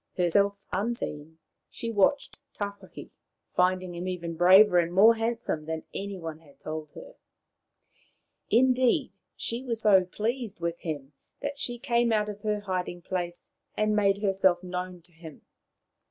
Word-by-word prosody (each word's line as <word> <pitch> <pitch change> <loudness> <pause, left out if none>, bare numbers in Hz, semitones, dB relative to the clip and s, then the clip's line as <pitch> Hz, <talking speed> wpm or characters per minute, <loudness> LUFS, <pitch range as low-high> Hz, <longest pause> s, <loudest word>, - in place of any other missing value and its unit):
Herself 200 +3 +1
unseen, 160 -8 -3 0.3
she 230 - -5
watched 225 +7 +1 0.2
Tawhaki, 200 -2 -7 0.4
finding 185 0 +1
him 175 +2 -5
even 170 -2 -4
braver 180 +2 +7
and 170 0 0
more 205 +6 +7
handsome 225 -8 -2
than 160 -1 -3
any 200 0 -5
one 165 -3 -7
had 145 -4 -21
told 155 0 -6
her. - - -11 1.4
Indeed, 255 +1 +3 0.2
she 235 +2 -3
was 230 -3 -1
so 195 -4 +5
pleased 220 +2 -3
with 170 0 -3
him 145 -4 -6 0.3
that 285 0 -4
she 240 -3 -2
came 235 0 +1
out 210 -1 +1
of 205 0 -8
her 210 -1 -1
hiding 180 -3 -4
place 175 -1 -4 0.3
and 215 0 +2
made 200 0 +2
herself 190 -2 +2
known 180 -1 -5
to 175 - -26
him. 165 -2 -13
190 Hz, 145 wpm, -27 LUFS, 175-220 Hz, 1.4 s, braver